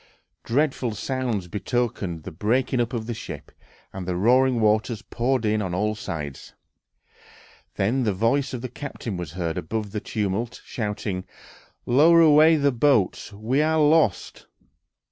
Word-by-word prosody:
Dreadful 130 -3 0
sounds 120 -7 -2
betokened 100 -4 -2
the - - -7
breaking 120 +9 0
up 120 - -2
of 115 -3 -3
the 120 - -3
ship, 110 - -8 0.4
and 95 -1 -6
the 90 - -1
roaring 125 +6 +3
waters 110 +1 +1
poured 125 0 -1
in 105 0 +1
on 90 -3 -3
all 105 +3 0
sides. 75 -9 -7 1.2
Then 115 +7 +1
the 110 - +1
voice 115 +8 +1
of 125 -2 -5
the - - -2
captain 125 -5 -6
was 85 -4 -6
heard 85 -2 -2
above 105 +3 -4
the 105 - -3
tumult, 110 +2 -3
shouting, 105 -4 -4 0.6
"Lower 155 +7 +5
away 160 0 +6
the 140 -2 +2
boats! 120 -6 +1
We 110 +8 0
are 160 +1 +2
lost!"... 150 - +2
115 Hz, 145 wpm, -24 LUFS, 100-130 Hz, 1.2 s, away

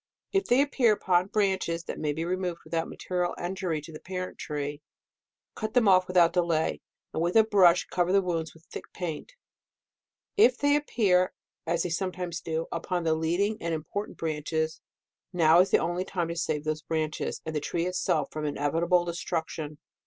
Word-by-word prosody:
If 390 0 +2
they 255 +3 +4
appear 255 -6 +3
upon 185 -3 +2
branches 190 -5 0
that - - -6
may 150 -1 0
be 160 +3 -3
removed 180 -1 -2
without 165 -1 -2
material 180 -1 -2
injury 175 -3 -2
to 150 - -11
the 155 - -8
parent 185 0 -6
tree, 145 0 -4 0.7
cut 215 +1 -5
them 240 -4 +5
off 185 -1 +5
without 175 -2 +4
delay, 170 -3 +1 0.3
and - - -1
with 170 +1 0
a 220 - +8
brush 185 -5 +5
cover 180 0 0
the 195 0 +4
wounds 165 -3 -2
with 160 - -18
thick - - -8
paint. 175 - -5 1.0
If 255 -11 +6
they 285 0 +3
appear, 200 -11 +2 0.3
as 170 0 +1
they 180 - -2
sometimes 180 -1 -3
do, 160 0 -2
upon 175 +1 -2
the 160 -1 +2
leading 175 +7 0
and 165 -1 -1
important 200 +7 -5
branches, 160 0 -2 0.5
now 165 -2 +5
is 185 +2 +5
the - - +5
only 175 +1 -1
time 175 -3 -2
to 170 - -3
save 155 -3 -1
those 155 0 -2
branches, 155 -1 -2
and 160 -1 -4
the - - +2
tree 170 +3 -2
itself, 180 -5 0
from 155 0 -4
inevitable 165 +5 +1
destruction. 160 -3 -4
175 Hz, 180 wpm, -28 LUFS, 160-185 Hz, 1.0 s, a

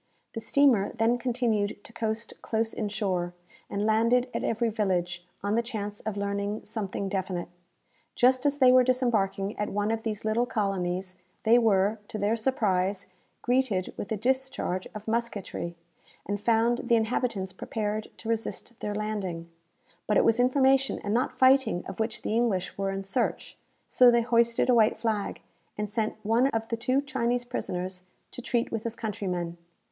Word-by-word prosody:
The 225 - -4
steamer 250 -7 +3
then 230 +2 +2
continued 230 -5 0
to 230 - -13
coast 225 0 -3
close 225 0 -1
in 210 -2 -2
shore, 180 -4 -2 0.3
and 205 +1 -1
landed 230 +3 +3
at - - -2
every 230 +1 +1
village, 180 -5 -1 0.2
on 205 +1 0
the 230 - +3
chance 210 -4 -5
of 215 -1 -4
learning 200 +1 -2
something 200 -2 -3
definite. 185 -2 -3 0.7
Just 255 +1 +4
as 285 0 +1
they 260 -3 +6
were 255 0 +7
disembarking 220 -6 +1
at 210 - -1
one 205 +2 0
of 225 0 -1
these 215 -2 -4
little 230 +3 +1
colonies, 185 -4 -2 0.3
they 230 +2 +6
were, 210 -1 +3
to - - -5
their 210 +2 +1
surprise, 200 -6 0 0.3
greeted 245 -7 +1
with 205 - -6
a 220 - 0
discharge 260 -5 -1
of 215 +1 -8
musketry, 220 -6 -3 0.5
and 205 +1 -3
found 235 +2 +3
the 235 -1 +4
inhabitants 220 -4 -1
prepared 215 +2 -3
to 225 - -10
resist 230 +1 -3
their 210 0 -3
landing. 190 -6 -3 0.6
But 210 - +3
it - - +4
was 225 +1 +3
information 265 +1 +3
and 205 - -1
not 245 +3 0
fighting 260 -8 +4
of 195 - -8
which 220 0 -2
the - - -1
English 215 -6 0
were 195 0 -1
in 195 0 -3
search; 210 +5 -2 0.3
so 250 -1 +6
they 235 0 +4
hoisted 235 0 +2
a 250 - +5
white 225 -1 +4
flag, 220 -2 -2 0.4
and 210 0 -2
sent 215 +1 -2
one 230 +5 +3
of 225 -4 -2
the 230 - 0
two 255 +4 +1
Chinese 245 -3 0
prisoners 185 -6 -4 0.3
to - - -7
treat 240 -1 -1
with 225 - -2
his 230 -1 -4
countrymen. 180 -6 -3
220 Hz, 170 wpm, -28 LUFS, 200-240 Hz, 0.7 s, were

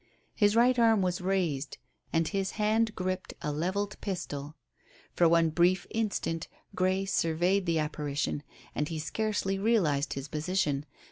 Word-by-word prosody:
His 205 -1 +3
right 245 +2 +4
arm 225 -4 +5
was 180 +1 -1
raised 175 -7 -1 0.3
and 165 -1 +2
his 195 0 -2
hand 215 +1 +1
gripped 185 0 -3
a 150 - -1
levelled 190 +7 -2
pistol. 150 -6 -4 0.6
For 170 -2 +4
one 165 -1 +4
brief 175 +3 +3
instant 200 -7 -1 0.3
Grey 185 +1 +1
surveyed 180 +1 +1
the 165 -1 +2
apparition, 150 -2 -2 0.3
and 150 - -1
he 165 - -3
scarcely 195 +3 -1
realized 170 -10 +2
his 135 +1 -5
position. 150 -2 -1
180 Hz, 140 wpm, -29 LUFS, 155-200 Hz, 0.6 s, arm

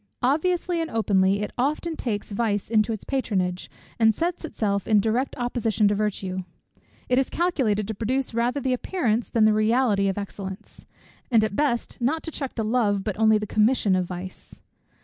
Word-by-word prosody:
Obviously 340 +5 +1
and 325 - -3
openly, 200 -3 +2
it - - -4
often 305 +5 0
takes 215 -7 -4
vice 205 -1 -1
into 215 0 +3
its 220 - -4
patronage, 185 -9 -2 0.3
and 220 -2 +4
sets 345 +1 -2
itself 200 -10 -2
in 215 -2 +5
direct 230 +6 0
opposition 230 -3 +1
to 205 - +2
virtue. 190 -3 -2 0.6
It 250 +1 +3
is 270 - 0
calculated 250 - 0
to 220 - -3
produce 250 +5 -2
rather 240 +4 0
the 260 -1 0
appearance 245 - -1
than 225 -2 +3
the 215 - +5
reality 215 -2 +2
of 195 - -1
excellence; 195 -1 -7 0.4
and 225 -3 +4
at 215 -2 -1
best 250 -4 -1
not 300 +7 0
to 325 - -5
check 275 -3 -4
the 225 - -1
love 215 -3 +1
but 210 -1 -3
only 220 -1 +5
the 210 - -3
commission 210 -1 +2
of 185 -1 0
vice. 180 +1 -9
220 Hz, 180 wpm, -25 LUFS, 205-255 Hz, 0.6 s, in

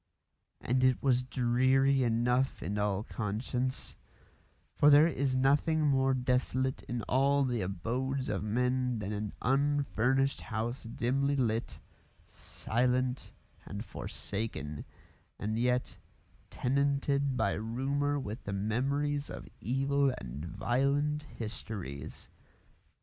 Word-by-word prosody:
And 130 +1 +1
it 130 0 +3
was 130 -2 +3
dreary 130 +3 +2
enough 125 +2 +1
in 100 +5 -2
all 105 -1 0
conscience, 120 +5 -3 0.8
for 145 - +6
there 145 +1 +8
is 140 -5 0
nothing 145 +4 +3
more 135 -2 +3
desolate 130 +1 0
in 120 -2 -2
all 140 +2 +3
the 120 -3 -1
abodes 125 +9 -2
of 105 - -1
men 125 +3 0
than 105 -1 -4
an 105 0 -3
unfurnished 135 -1 +2
house 115 +4 -4
dimly 135 +5 0
lit, 115 -4 -1 0.5
silent, 125 +2 -1 0.3
and 100 +3 -6
forsaken, 95 -13 -5 0.5
and 110 +2 -2
yet 125 +1 0 0.5
tenanted 140 0 +1
by 105 -4 +2
rumour 135 +6 -1
with 110 -1 -6
the 100 - -3
memories 140 +8 -1
of - - -8
evil 135 +4 +2
and 65 +3 -7
violent 140 - 0
histories. 105 - -6
125 Hz, 110 wpm, -31 LUFS, 110-135 Hz, 0.8 s, there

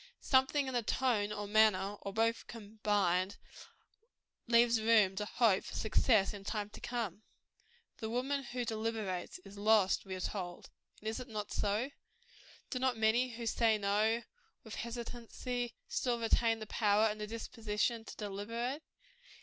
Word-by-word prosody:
Something 265 +2 +3
in 260 - -3
the 240 - +2
tone, 220 -3 +1
or 210 -1 -3
manner, 205 -2 +4
or 200 - -5
both 225 +2 0
combined, 205 -4 0 1.1
leaves 235 -1 +5
room 215 -4 +4
to 210 - -1
hope 210 -3 +3
for - - -8
success 215 -2 +3
in 200 -1 -8
time 210 0 -3
to - - -11
come. 230 -5 -3 0.8
"The 220 -3 -4
woman 265 +4 0
who 245 0 -3
deliberates, 220 -5 -3
is 200 +1 -11
lost," 210 -2 +4
we 190 -1 -5
are - - -6
told: 180 -3 -5 0.3
and 215 - -8
is 220 +2 -2
it 250 - -7
not 215 -3 -5
so? 210 +7 0 0.8
Do 255 - -1
not 255 -2 +1
many 235 +3 +2
who 235 0 -5
say 225 -1 +3
no 210 +3 +1 0.4
with 220 - -9
hesitancy, 240 +1 -4
still 245 -2 0
retain 225 0 +2
the 215 - -6
power 210 0 +3
and 215 -1 -1
the 210 - -3
disposition 225 0 -2
to - - -9
deliberate? 230 +7 -3
220 Hz, 155 wpm, -34 LUFS, 205-235 Hz, 1.1 s, leaves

